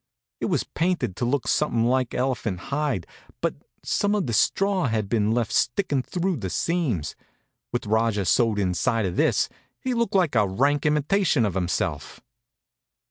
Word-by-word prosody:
It - - -1
was - - +1
painted 170 - -1
to 120 - -1
look 130 +2 0
something 120 -7 +1
like 130 0 +1
elephant 125 -7 -1
hide, 140 - 0 0.3
but - - 0 0.3
some 205 +1 +1
of 200 -4 0
the 115 - -3
straw 195 - +2
had 110 -3 -1
been 105 -1 +1
left 115 -1 0
sticking 140 0 +1
through 180 +5 -2
the 95 -6 -4
seams. 125 - -1 0.6
With 120 0 -2
Rajah 110 -2 +1
sewed 115 +1 +3
inside 100 +3 +1
of 90 -2 -2
this, - - +2 0.3
he 255 - -2
looked 235 -4 0
like 180 -6 +3
a 105 -4 +3
rank 140 +9 +1
imitation 150 - +2
of 100 - -1
himself. 90 -1 -2
125 Hz, 160 wpm, -25 LUFS, 105-160 Hz, 0.6 s, sewed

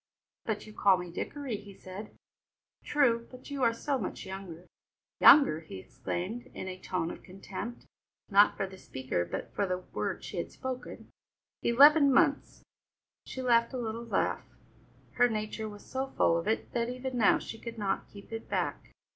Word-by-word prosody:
"But 220 -2 -2
you 215 - -12
call 195 -3 +4
me 180 -1 -6
Dickory," 265 +5 -4
he 200 -1 -12
said. 190 +4 -9 0.7
"True, 235 -6 +2
but 255 +3 -12
you 280 -1 -3
are 235 -2 +5
so 270 +4 -2
much - - -5
younger." 190 -3 -8 0.5
"Younger!" 275 - +8
he 160 -11 -9
exclaimed 175 - -5
in - - -5
a 185 0 -6
tone 175 -3 -2
of - - -9
contempt, 195 +5 -7 0.4
not 205 0 +5
for - - 0
the 190 0 -11
speaker 130 - -2
but 85 - -6
for 200 - 0
the 180 0 0
word 180 - -4
she - - -6
had - - -3
spoken. 260 -1 -6 0.5
"Eleven 285 +4 +7
months!" - - +2 0.6
She 260 - -5
laughed 235 0 +3
a - - -2
little 230 -1 -3
laugh; 235 - -1 0.7
her 245 0 +5
nature 215 0 -3
was 205 -1 -12
so 265 +1 -3
full 170 - +2
of 170 +3 -2
it 220 - -1
that 235 0 -1
even 255 +1 -4
now 225 -4 +5
she 225 - -8
could 230 0 -7
not 200 -3 -1
keep 200 +1 -14
it 225 0 -6
back. - - -2
220 Hz, 175 wpm, -30 LUFS, 190-245 Hz, 0.7 s, Younger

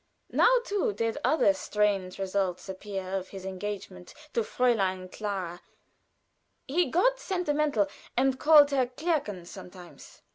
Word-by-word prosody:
Now - - +5 0.2
too 400 - 0
did 230 +6 -2
other 260 -10 +4
strange 195 -1 -1
results 195 -2 -2
appear 190 0 -6
of 190 -1 -2
his 190 -1 -9
engagement 190 -2 -6 0.2
to 235 - +2
Fräulein 195 -6 0
Clara 190 -5 -4 1.1
(he 340 +6 +2
got - - +2
sentimental 300 - 0 0.3
and 260 0 +2
called 295 -2 +7
her 260 -3 +2
Clärchen 250 - -2
sometimes). 180 -1 -12
205 Hz, 120 wpm, -28 LUFS, 190-285 Hz, 1.1 s, called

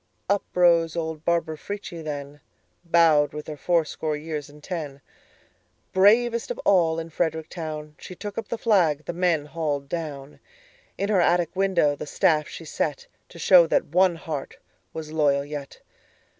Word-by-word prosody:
Up 200 +1 +1
rose 170 -2 +4
old 160 -2 -4
Barbara 165 -2 0
Frietchie 200 -5 -6
then, 145 -1 -6 0.4
Bowed 165 -4 +4
with 150 0 -6
her 155 - -6
fourscore 155 -1 0
years 150 -1 -5
and 150 +1 -16
ten; 150 -6 -5 0.9
Bravest 230 +5 +4
of - - -3
all 165 -4 +4
in 165 0 -5
Frederick 160 -1 -2
town, 155 -3 -6
She 185 - -9
took 205 +2 -7
up 225 -2 -4
the 235 - -3
flag 170 -10 +2
the - - -4
men 170 -4 +1
hauled 150 -3 -3
down; 150 -3 -6 0.6
In 200 - -1
her 200 -4 +3
attic 175 0 +2
window 185 -6 +2
the 145 - -7
staff 150 0 +2
she 165 - -9
set, 150 -1 -2 0.2
To 175 - -13
show 170 0 +6
that - - +1
one 185 -1 +4
heart 155 -4 -6 0.3
was 155 -1 -7
loyal 145 -3 +2
yet. 145 -1 -8
160 Hz, 160 wpm, -25 LUFS, 150-180 Hz, 0.9 s, show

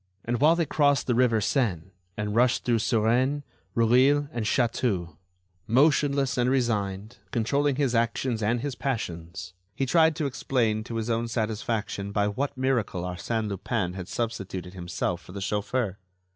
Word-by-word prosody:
And 120 +1 -1
while 155 +3 +6
they 170 -1 +1
crossed 145 -3 +2
the 125 - +1
river 120 -2 +3
Seine 100 - 0 0.3
and 105 0 -2
rushed 120 +2 +2
through 120 -2 +2
Suresnes, 120 +7 +1 0.3
Rueil 130 +5 +4
and 115 -3 -2
Chatou, 105 - 0 0.5
motionless 140 +1 +3
and 125 +1 +3
resigned, 110 -5 -1
controlling 140 +5 +1
his 135 -3 +1
actions 115 0 0
and 115 +3 +1
his 145 0 -3
passions, 90 -9 -4 0.2
he 135 - 0
tried 160 +3 +4
to 155 - -2
explain 120 -5 0
to 115 - -6
his 115 +1 -2
own 115 +1 0
satisfaction 110 -2 -2
by 105 0 +1
what 135 +7 -2
miracle 125 -9 0
Arsène 105 +5 -2
Lupin 100 -1 -2
had 95 -1 -6
substituted 95 -6 -4
himself 85 -1 -3
for 90 - -13
the 100 - -5
chauffeur. 105 +1 -1
115 Hz, 155 wpm, -27 LUFS, 100-130 Hz, 0.5 s, while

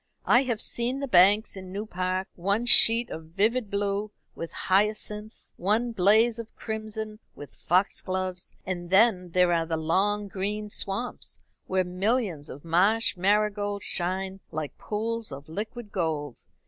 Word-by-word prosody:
I 245 - +5
have 235 -4 -1
seen 245 +3 +1
the 275 - -3
banks 205 +1 +5
in 185 -1 -9
New 205 +3 -4
Park 185 -1 -2
one 200 +6 -1
sheet 235 0 +6
of 160 0 -7
vivid 210 +7 0
blue 200 +1 -1 0.2
with 165 - -7
hyacinths, 210 +2 -1
one 220 +6 +1
blaze 220 +3 +3
of 230 -1 -9
crimson 220 -1 -5 0.2
with 145 - -11
foxgloves; 185 0 0
and 175 -2 -4
then 190 -2 +4
there 180 0 +3
are 165 -1 0
the 160 -1 -1
long 200 +6 0
green 205 +2 -3
swamps, 200 +6 -3 0.3
where 185 0 +1
millions 185 - -1
of 145 +5 -10
marsh 195 +8 +2
marigolds 205 +1 0
shine 190 +2 -1
like 155 -2 -5
pools 225 +1 -3
of 140 +2 -9
liquid 210 +6 -6
gold. 155 - -2
200 Hz, 145 wpm, -27 LUFS, 180-220 Hz, 0.3 s, sheet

